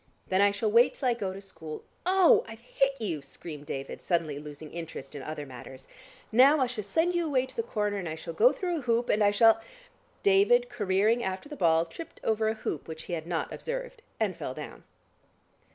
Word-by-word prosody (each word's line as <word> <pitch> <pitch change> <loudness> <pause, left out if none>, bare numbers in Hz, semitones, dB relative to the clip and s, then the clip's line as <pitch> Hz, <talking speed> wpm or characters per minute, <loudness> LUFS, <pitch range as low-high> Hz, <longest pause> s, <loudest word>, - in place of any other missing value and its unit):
"Then 185 +1 +3
I 205 - +6
shall 205 +2 -1
wait 235 +3 +5
till 260 - 0
I - - +3
go 200 -5 -3
to 190 - -8
school. 160 -6 -9 0.2
Ow! 375 -2 +6
I've 225 0 -10
hit 270 +3 0
you," 175 -10 -2
screamed 145 +1 -9
David 135 0 -5
suddenly 165 -5 -1
losing 150 0 -9
interest 165 -5 -7
in 145 - -6
other 150 +1 -5
matters. 130 0 -11 0.4
"Now 270 +7 +6
I 260 - +4
shall 240 -4 -4
send 330 - +1
you 345 -2 0
away 260 -3 +2
to 260 - -13
the - - 0
corner, 210 - -2
and 180 -4 -4
I 155 - -4
shall 165 +1 -7
go 230 +10 +5
through 350 +3 -2
a - - -6
hoop, 240 -1 0
and 210 - +3
I 205 - +6
shall 225 +2 +5 0.3
" - - -36
David 415 +5 +4
careering 210 - +1
after 190 +9 -4
the 295 - -6
ball, 165 - +3
tripped 245 - -10
over 220 0 +1
a 220 - -1
hoop 160 -8 -4
which 160 0 -7
he - - -6
had 160 -1 -4
not 170 -2 -2
observed, - - -5 0.2
and - - 0
fell - - -5
down. - - -9
210 Hz, 220 wpm, -29 LUFS, 165-260 Hz, 0.4 s, I